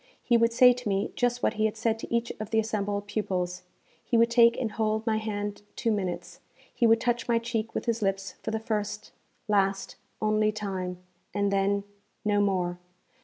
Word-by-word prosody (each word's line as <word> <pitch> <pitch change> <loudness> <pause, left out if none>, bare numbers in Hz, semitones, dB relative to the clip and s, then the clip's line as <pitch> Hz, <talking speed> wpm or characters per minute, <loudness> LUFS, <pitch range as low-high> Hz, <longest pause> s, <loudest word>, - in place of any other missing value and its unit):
He 240 - +3
would 230 0 +4
say 250 +1 +7
to 245 -3 -5
me 195 0 0
just 245 0 0
what - - +2
he 215 0 +1
had 220 0 -1
said 225 0 0
to - - -8
each 235 0 0
of 215 -1 -5
the 225 - 0
assembled 205 -2 -1
pupils. 185 -4 -2 0.4
He 235 - +1
would 230 +1 +4
take 235 -1 +5
and 230 -4 -1
hold 220 0 -1
my 220 -2 +2
hand 205 -2 -3
two 230 - 0
minutes. 190 -4 -3 0.3
He 235 - +3
would 225 0 +5
touch 240 0 0
my 235 -1 +3
cheek 230 -1 -3
with - - -2
his 230 -1 0
lips 195 -1 -1
for - - -4
the 220 - -1
first, 210 -1 -3 0.4
last, 195 -2 +1 0.2
only 215 0 +2
time, 190 -4 -4 0.4
and 200 -1 +1
then 200 +1 +1 0.4
no 205 -1 +3
more. 180 -3 0
215 Hz, 195 wpm, -28 LUFS, 200-230 Hz, 0.4 s, say